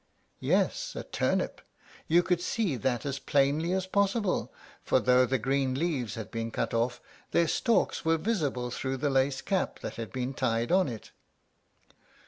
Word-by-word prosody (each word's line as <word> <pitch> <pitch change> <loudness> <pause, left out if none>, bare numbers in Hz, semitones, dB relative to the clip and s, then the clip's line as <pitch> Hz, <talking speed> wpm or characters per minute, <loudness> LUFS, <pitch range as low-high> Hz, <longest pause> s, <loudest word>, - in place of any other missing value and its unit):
Yes, - - 0
a - - -4
turnip! - - -1 0.5
You 170 +2 +5
could 180 -1 +1
see 185 -4 0
that 120 +2 -1
as 140 -1 -2
plainly 145 +5 +2
as 190 0 0
possible, 200 +1 0 0.3
for - - +2
though 125 0 +4
the 130 +2 +1
green 135 +2 0
leaves 140 -7 -1
had 110 -2 -7
been 115 0 -3
cut 115 0 -2
off, 120 +1 0 0.3
their 170 - +3
stalks 230 +7 +1
were 165 0 +3
visible 150 - -1
through 130 +1 -2
the 145 +2 0
lace 135 0 +2
cap 195 -2 -1
that - - -6
had 115 -1 -5
been 130 +1 -3
tied 120 -1 0
on 185 0 +4
it. 115 -4 -7
135 Hz, 165 wpm, -29 LUFS, 125-175 Hz, 0.5 s, You